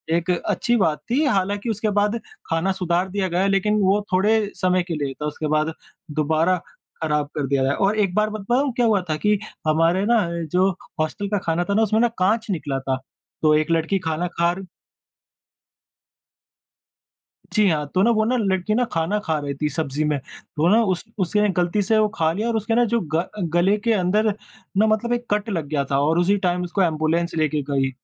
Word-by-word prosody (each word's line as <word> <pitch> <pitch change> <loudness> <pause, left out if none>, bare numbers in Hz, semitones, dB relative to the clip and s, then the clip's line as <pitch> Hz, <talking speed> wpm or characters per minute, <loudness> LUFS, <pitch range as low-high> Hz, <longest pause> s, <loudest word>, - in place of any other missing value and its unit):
एक 170 +2 0
अच्छी 235 +6 0
बात 160 -8 +1
थी 290 +5 +3
हालाँकि 205 -2 0
उसके 215 0 -1
बाद 210 +3 0 0.3
खाना 165 +4 +1
सुधार 175 +2 +1
दिया 195 0 -1
गया 180 +3 +1
लेकिन 205 +2 +2
वो 195 +2 +3
थोड़े 210 +4 +4 0.2
समय 185 -1 +1
के 170 - -3
लिए 140 -2 -3
था, 150 - -6
उसके 150 +1 -3
बाद 155 +1 +1 0.4
दोबारा 160 +4 +1 0.5
ख़राब 150 -2 0
कर 145 -3 -1
दिया 135 0 +1
गया। 135 +1 +2
और 205 +2 +1
एक 195 -3 +1
बार 215 0 +2
बताऊँ 240 +6 0
क्या 245 -2 +2
हुआ 210 -4 +3
था 155 - +1
कि 210 -1 +3 0.3
हमारे 165 +5 +2
ना 235 0 +4 0.3
जो 185 +2 +3 0.3
हॉस्टल 180 +6 -2
का 205 - +1
खाना 165 +1 +1
था - - +2
ना 220 - +3
उसमें 220 +1 +2
ना 240 - +5
काँच 220 +5 +1
निकला 145 -6 -2
था। 130 0 -2 0.4
तो 155 -1 +4
एक 155 +2 +1
लड़की 165 +4 +1
खाना 165 +1 -2
खार 175 +3 +1 2.9
जी 210 -2 +4
हाँ, 150 -3 0
तो 185 - +3
ना 235 - +4
वो 220 -1 +2
न 240 - 0 0.2
लड़की 190 +3 0
न 245 +1 +2
खाना 165 +6 0
खा 160 -2 0
रही 145 -1 -4
थी 150 - +2
सब्ज़ी 155 -1 -2
में, 150 -2 +1 0.4
तो 160 +3 +2
न 230 - +5
उस 180 - -2 0.2
उसने 210 +3 +2
गलती 180 +4 +1
से 220 +2 +2
वो 215 0 +2 0.2
लिया 215 +6 -2
और 230 - 0
उसके 220 +1 -1
न 240 0 +4
जो 235 +1 +1
ग 170 +3 +2 0.3
गले 185 +4 +3
के 230 +1 +1
अंदर 210 +2 +2 0.5
न 215 - +5
मतलब 220 +2 +1
एक 240 0 -2
कट 210 +2 0
लग 165 -7 -2
गया 145 -2 0
था। 135 - +2
और 160 +4 +2
उसी 195 +4 +3
टाइम 180 0 0
उसको 185 +2 0
एंबुलेंस 165 +1 0
लेके 155 -1 0
गई, 135 -1 +1
185 Hz, 205 wpm, -22 LUFS, 160-210 Hz, 2.9 s, ना